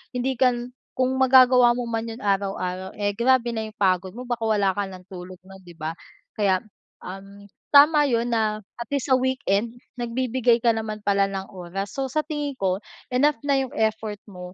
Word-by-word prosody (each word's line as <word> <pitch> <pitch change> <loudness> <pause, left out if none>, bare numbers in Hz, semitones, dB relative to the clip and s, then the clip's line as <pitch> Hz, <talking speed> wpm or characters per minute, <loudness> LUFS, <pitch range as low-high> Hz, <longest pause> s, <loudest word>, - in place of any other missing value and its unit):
hindi 260 +2 0
ka 255 -1 +5
n 240 +1 -7 0.2
kung 255 0 +1
magagawa 255 -2 +6
mo 245 -1 -4
man 225 0 -2
yung 225 - -9
araw-araw, 190 -2 -1
eh, 205 0 0
grabe 240 0 +2
na 220 - -2
yung 215 - -14
pagod 185 -1 +1
mo 245 +3 -7
baka 240 -2 -2
wala 205 -3 +2
ka 205 - -1
ng 185 -1 -11
tulog 185 0 -9
non 190 0 -13
di 175 - -13
ba? 160 0 -5 0.4
Kaya 195 -3 +2 0.4
um, 195 +2 -10 0.3
tama 295 +1 +7
yun 235 0 +1
na 215 -2 0 0.2
at 235 -2 -6
least 280 -1 -1
sa - - +7
weekend 245 -4 0 0.2
nagbibigay 240 0 +1
ka 235 - +5
naman 220 -1 -4
pala 200 -1 +3
ng 195 0 -5
oras, 190 +2 -6
so 270 -1 -1
sa 310 - +1
tingin 295 -2 -3
ko 190 -1 +1 0.4
enough 285 +1 +3
na 280 -1 +3
yung - - -10
effort 220 -1 -1
mo, 180 -1 -9
220 Hz, 195 wpm, -24 LUFS, 195-255 Hz, 0.4 s, tama